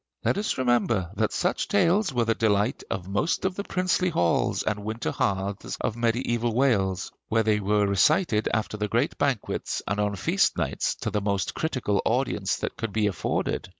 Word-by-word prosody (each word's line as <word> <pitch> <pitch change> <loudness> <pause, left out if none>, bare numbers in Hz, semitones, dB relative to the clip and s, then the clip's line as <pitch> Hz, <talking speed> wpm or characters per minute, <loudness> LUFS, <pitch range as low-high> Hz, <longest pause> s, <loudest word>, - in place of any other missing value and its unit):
Let - - +2
us 210 - -1
remember 120 -8 +1
that 110 0 0
such 180 +1 0
tales 195 +1 +2
were 120 -2 +1
the 115 - +2
delight 105 +1 +1
of 95 -2 -4
most 105 - 0
of 190 - +1
the 200 - -4
princely 185 -1 0
halls 85 - +1
and 105 -1 -2
winter 110 +2 -3
hearths 100 0 -2
of 110 - -2
mediæval 120 0 0
Wales, 100 -8 +1 0.2
where 115 0 +2
they 105 -1 +2
were 105 +1 +2
recited 110 - +2
after 110 -1 -1
the 105 0 -1
great 115 +3 0
banquets 140 -6 -1
and 100 +2 -1
on 105 0 0
feast 90 - +1
nights - - -1
to - - -2
the 105 - 0
most 100 -1 -1
critical 130 -10 -1
audience 110 -6 0
that - - -5
could 115 -2 -3
be 110 -1 +1
afforded. 90 -1 -1
110 Hz, 185 wpm, -26 LUFS, 100-130 Hz, 0.2 s, Let